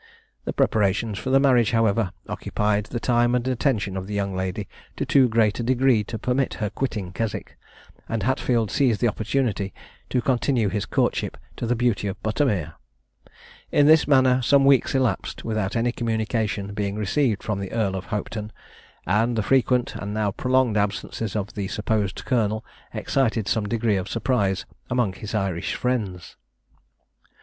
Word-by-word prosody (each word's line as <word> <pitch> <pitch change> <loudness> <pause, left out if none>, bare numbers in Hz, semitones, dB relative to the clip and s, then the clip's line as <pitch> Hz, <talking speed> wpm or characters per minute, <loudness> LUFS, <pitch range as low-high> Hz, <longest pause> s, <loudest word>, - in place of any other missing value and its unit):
The - - -1
preparations 105 0 +1
for 115 - -4
the 135 +1 +5
marriage, 125 -6 +4
however, 110 -3 +2 0.2
occupied 105 0 -1
the 120 - -4
time 120 +1 +2
and 125 0 -1
attention 115 -6 0
of 95 0 -4
the 105 - -4
young 100 -1 -1
lady 95 +2 -3 0.3
to - - -1
too 130 -3 +4
great 110 -1 +2
a - - -1
degree 125 -2 +3
to 115 - -5
permit 125 +3 0
her 105 -3 -3
quitting 105 -6 -3
Keswick, 110 +2 -4 0.5
and 115 -2 -1
Hatfield 120 -4 +1
seized 125 -7 +2
the 120 - +3
opportunity 110 -3 -1 0.3
to 125 - +1
continue 120 -2 +1
his 105 -1 -2
courtship - - 0 0.2
to 120 - -4
the 125 - +2
Beauty 115 -4 0
of 100 +1 -4
Buttermere. 105 - 0 1.0
In 145 - +4
this 155 +1 +6
manner 130 -2 +4
some 135 +3 +4
weeks 135 -1 +4
elapsed, 130 -3 -1
without 110 -3 -1
any 120 +1 +1
communication 110 -3 -2
being 100 -1 -2
received 105 +2 0
from 105 -2 -2
the 100 -1 -5
Earl 105 -4 0
of 95 0 -5
Hopetoun; 105 +1 -4 0.5
and 110 +7 +2
the 110 - 0
frequent, 125 +1 +2
and 100 +1 -5
now 105 -2 +1
prolonged, 125 0 +1
absences 105 +1 -2
of 105 0 -3
the 100 -3 -3
supposed 105 -2 -2
colonel 110 -4 0 0.3
excited 115 -6 0
some 105 -1 0
degree 115 -2 +1
of 95 0 -4
surprise 105 -5 0 0.2
among 120 -6 +1
his 105 +3 -6
Irish 95 -5 -1
friends. 105 -9 -3
110 Hz, 165 wpm, -24 LUFS, 100-125 Hz, 1.0 s, this